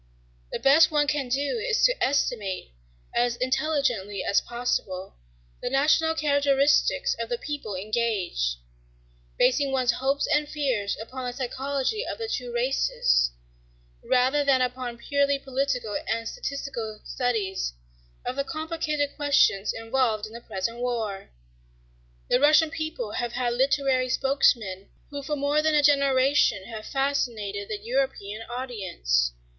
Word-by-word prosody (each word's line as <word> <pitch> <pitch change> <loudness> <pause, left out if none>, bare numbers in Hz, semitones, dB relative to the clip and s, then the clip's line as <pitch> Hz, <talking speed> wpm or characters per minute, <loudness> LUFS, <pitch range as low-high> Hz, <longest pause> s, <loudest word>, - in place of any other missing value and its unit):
The - - -2
best 295 +4 +6
one 300 -2 +2
can 290 -3 -1
do 280 - 0
is 450 0 0
to - - +2
estimate, 210 - -1 0.4
as 240 0 +1
intelligently 255 -7 0
as - - +2
possible, 200 -6 -3 0.5
the - - -2
national 310 +4 +3
characteristics 285 - +2
of - - -3
the 480 - -1
peoples 280 - -5
engaged, 195 - -1 0.8
basing 275 +1 +3
one's 255 -2 +2
hopes 275 +2 0
and 295 0 +1
fears 255 -9 -1
upon 255 +3 -6
the 245 - -3
psychology 270 - -2
of - - -5
the 455 -1 -4
two 250 - -3
races 235 - +2 0.7
rather 260 +3 +2
than 275 -2 +4
upon 250 -1 -2
purely 280 +3 +1
political 265 -5 -2 0.2
and 230 0 -1
statistical 265 - -5
studies 210 - -1 0.5
of 250 - -2
the 275 - +1
complicated 310 -2 -2
questions 275 -9 +3
involved 225 -1 0
in 215 - -11
the 235 - -8
present 230 +3 -4
war. 225 -5 -3 1.0
The 250 - +3
Russian 305 +2 +5
people 315 -9 -4
have 240 +1 -3
had 245 -1 0
literary 265 0 +2
spokesmen 230 -8 +1 0.2
who 285 -1 -5
for 295 +2 -2
more 290 +1 +1
than 310 0 +2
a 295 - +4
generation 275 -6 +3
have 220 -1 -8
fascinated 230 -8 -1
the 215 - -2
European 225 -2 -2
audience. 185 - -1
255 Hz, 135 wpm, -26 LUFS, 225-285 Hz, 1.0 s, best